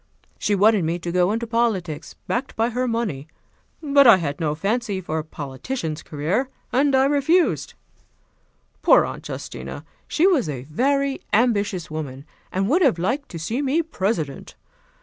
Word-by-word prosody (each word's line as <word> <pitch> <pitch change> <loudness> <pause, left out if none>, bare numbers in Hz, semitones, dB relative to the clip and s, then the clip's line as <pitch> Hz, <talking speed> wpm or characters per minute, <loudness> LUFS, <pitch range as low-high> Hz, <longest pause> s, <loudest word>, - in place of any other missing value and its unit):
"She 205 - +1
wanted 205 -1 +4
me 165 +2 0
to 170 0 -5
go 180 +2 +2
into 230 +2 -1
politics, 220 -9 -1
backed 260 +3 -2
by 230 +2 +1
her 250 +2 -1
money; 210 - -2 0.6
but 280 -2 +5
I 230 - +9
had 145 -5 -3
no 150 -2 0
fancy 205 +3 -1
for 160 -3 -3
a - - -4
politician's 155 - -5
career, 170 - -1 0.2
and 275 +1 +3
I 265 0 +4
refused. 295 +5 +2 1.1
Poor - - +6
Aunt - - -7
Justina! - - -7 0.2
She 330 - +2
was 320 - +3
a 130 -4 -4
very 275 - 0
ambitious 205 -7 +1
woman, 140 -3 -6 0.3
and 195 +1 0
would 325 - +3
have 270 - +4
liked 245 - -1
to 170 - -7
see 220 - -2
me 290 +4 +1
President. 190 - -3
210 Hz, 160 wpm, -23 LUFS, 160-265 Hz, 1.1 s, I